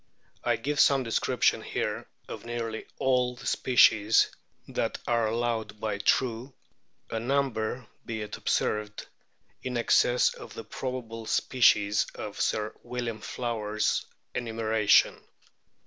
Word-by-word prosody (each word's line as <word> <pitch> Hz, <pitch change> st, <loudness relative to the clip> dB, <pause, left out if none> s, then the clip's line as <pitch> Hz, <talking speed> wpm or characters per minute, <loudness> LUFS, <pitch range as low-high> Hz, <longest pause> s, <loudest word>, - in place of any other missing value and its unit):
I 120 Hz, -, +2 dB
give 140 Hz, +6 st, -2 dB
some 135 Hz, -2 st, +5 dB
description 115 Hz, -2 st, +1 dB
here -, -, -3 dB, 0.2 s
of -, -, -7 dB
nearly 115 Hz, -1 st, -4 dB
all 125 Hz, -1 st, +1 dB
the -, -, -12 dB
species 110 Hz, -4 st, +4 dB, 0.4 s
that -, -, -2 dB
are 115 Hz, -2 st, +2 dB
allowed 110 Hz, -2 st, -2 dB
by 105 Hz, -2 st, -2 dB
True, 120 Hz, +4 st, 0 dB, 0.6 s
a 115 Hz, -, -1 dB
number 125 Hz, -2 st, -1 dB, 0.2 s
be 110 Hz, -2 st, -4 dB
it 105 Hz, -, -6 dB
observed 105 Hz, 0 st, -1 dB, 0.6 s
in 125 Hz, -1 st, -3 dB
excess 120 Hz, +1 st, +3 dB
of -, -, -11 dB
the 115 Hz, -, -6 dB
probable 115 Hz, -1 st, -5 dB
species 105 Hz, -5 st, +3 dB
of -, -, -6 dB
Sir 105 Hz, 0 st, 0 dB
William 120 Hz, -2 st, -4 dB
Flower's 110 Hz, -3 st, -1 dB, 0.3 s
enumeration. 110 Hz, -3 st, +2 dB
115 Hz, 115 wpm, -28 LUFS, 110-125 Hz, 0.6 s, some